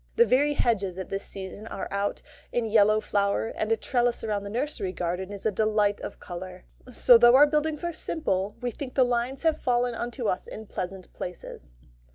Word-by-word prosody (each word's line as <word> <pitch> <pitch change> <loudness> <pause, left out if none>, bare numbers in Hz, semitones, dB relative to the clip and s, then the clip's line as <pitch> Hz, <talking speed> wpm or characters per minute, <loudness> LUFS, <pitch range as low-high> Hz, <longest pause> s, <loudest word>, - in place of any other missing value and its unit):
The 470 - +6
very 290 - +3
hedges 200 -9 0
at 190 - -6
this 195 0 -2
season 195 +2 -7
are 195 - -5
out 200 +1 -2 0.3
in 240 -1 0
yellow 215 0 +4
flower, 200 +2 0
and 215 +1 -3
a 225 - +3
trellis 245 -1 0
round 210 -2 -1
the 200 - -6
nursery 235 -4 -2
kitchen 180 +2 -3
is 200 -1 -8
a 220 - +3
delight 210 0 +1
of - - -7
colour; 180 0 -8 0.3
so 240 0 +7
though 240 +1 +7
our 285 +2 +8
buildings 300 +1 -1
are 345 0 -2
simple, 205 - -2
we 245 0 -2
think 255 +3 -7
the 265 - +5
lines 245 +3 -1
have 320 -1 +1
fallen 245 0 +1
unto 240 +1 -4
us 185 - -1
in 220 - -8
pleasant 185 -2 -6
places. 170 - -8
220 Hz, 200 wpm, -27 LUFS, 195-245 Hz, 0.3 s, our